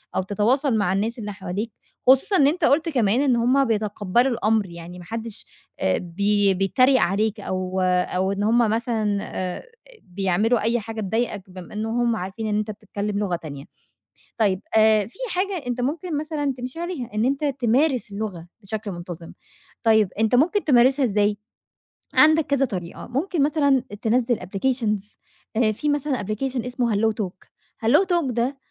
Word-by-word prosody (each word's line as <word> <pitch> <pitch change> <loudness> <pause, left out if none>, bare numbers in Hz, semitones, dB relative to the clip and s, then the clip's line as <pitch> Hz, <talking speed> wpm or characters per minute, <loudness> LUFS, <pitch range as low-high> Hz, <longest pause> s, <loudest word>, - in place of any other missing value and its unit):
أو - - +2
تتواصل 230 +6 +1
مع 200 -3 +1
الناس 220 +5 -1
اللي 210 -2 -5
حواليك، 200 +3 -4 0.4
خصوصًا 270 +10 +5
إن 280 - +5
أنت 320 +2 +1
قُلت 325 +4 +3
كمان 240 -4 +2
إن 265 -4 +3
هُم 255 +4 +3
بيتقبلوا 215 +2 +1
الأمر 220 -2 +1
يعني 170 +1 -10
ما 175 - -11
حدش 225 +2 -6 0.3
آآ، 95 0 +1
بي 200 +3 +1
بيتريق 255 +8 +3
عليك 210 +4 +1
أو 185 -1 -2
أو 185 +1 +1
إن 200 +1 -2
هُم 225 +3 +3
مثلًا 225 -2 +1
آآ، 185 -1 -4 0.4
بيعملوا 195 +5 +1
أي 230 +2 +1
حاجة 225 0 -6
تضايقك 205 -2 -2
بما 185 0 -10
إن 215 +1 -3
هُم 235 +1 +1
عارفين 195 +3 -4
إن 210 -1 0
أنت 215 0 -2
بتتكلم 205 0 -4
لغة 195 -4 0
تانية، 145 -4 -8 0.7
طيب 200 -4 +2 0.2
آآ، 215 -2 +5
في 230 - -17
حاجة 370 -5 -2
أنت 245 0 -2
ممكن 300 +5 -2
مثلًا 295 -3 -2
تمشي 250 +6 -6
عليها 340 -9 -4
إن 215 +2 +1
أنت 275 +3 0
تمارس 260 -3 +1
اللغة 200 -5 -5 0.2
بشكل 210 +1 -4
منتظم، 175 -1 -8 0.5
طيب 220 -4 +4
أنت 220 +2 +2
ممكن 350 - +3
تمارسها 265 0 +4
إزاي؟ 205 -2 +1 0.8
عندك 315 0 +5
كذا 275 -1 +2
طريقة، 180 -8 -6
ممكن 290 +5 0
مثلًا 285 -3 +2 0.2
تنزّل 240 +1 +1
applications، 210 +1 -2 0.4
آآ، 220 -1 +3
في 295 +8 -2
مثلًا 290 -2 0
application 245 +4 -3
اسمه 245 -3 0
Hello 220 +2 +3
Talk، 185 0 -9 0.4
Hello 230 - +6
Talk 345 -8 0
ده 245 +4 -1
225 Hz, 165 wpm, -23 LUFS, 200-260 Hz, 0.8 s, Hello